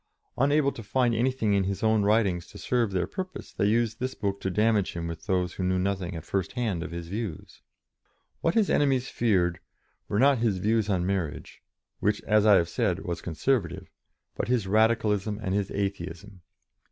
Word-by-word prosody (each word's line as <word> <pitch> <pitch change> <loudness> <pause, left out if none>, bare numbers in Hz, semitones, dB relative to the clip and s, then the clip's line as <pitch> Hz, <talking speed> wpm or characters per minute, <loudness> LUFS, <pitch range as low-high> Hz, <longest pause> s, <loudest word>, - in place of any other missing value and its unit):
Unable 140 +1 +3
to 115 - -9
find 120 +3 +1
anything 115 -2 +1
in 100 -1 +2
his 100 +2 -3
own 110 -1 +3
writings 100 -4 +2
to - - -12
serve 120 -4 0
their 95 -2 0
purpose, 185 -1 -7
they 100 - +1
used 115 +1 +1
this 130 +1 -3
book 100 -2 -3
to 95 - -1
damage 105 0 +2
him 85 -1 -4
with 85 -1 -7
those 90 -2 0
who 95 - -4
knew 95 0 +1
nothing 95 -2 -2
at 80 - -7
first 95 -3 -2
hand 110 -9 -1
of 90 - -5
his 85 0 -6
views. 100 -3 -6 0.8
What 165 - 0
his 220 -3 +4
enemies 135 -3 +2
feared 90 -7 +1 0.5
were 100 - -1
not 135 +2 +4
his 110 -5 +1
views 110 +2 +1
on 90 -3 +1
marriage 95 -6 -3 0.4
which, 105 +1 +1
as 110 0 +3
I 105 - +8
have 85 -3 +3
said, 95 -2 -1
was 85 -1 -3
conservative 90 - -1 0.4
but - - -2
his 120 -4 +1
Radicalism 105 0 +2
and 95 -4 -2
his 100 -1 0
Atheism. 95 -1 -4
100 Hz, 190 wpm, -27 LUFS, 90-115 Hz, 0.8 s, I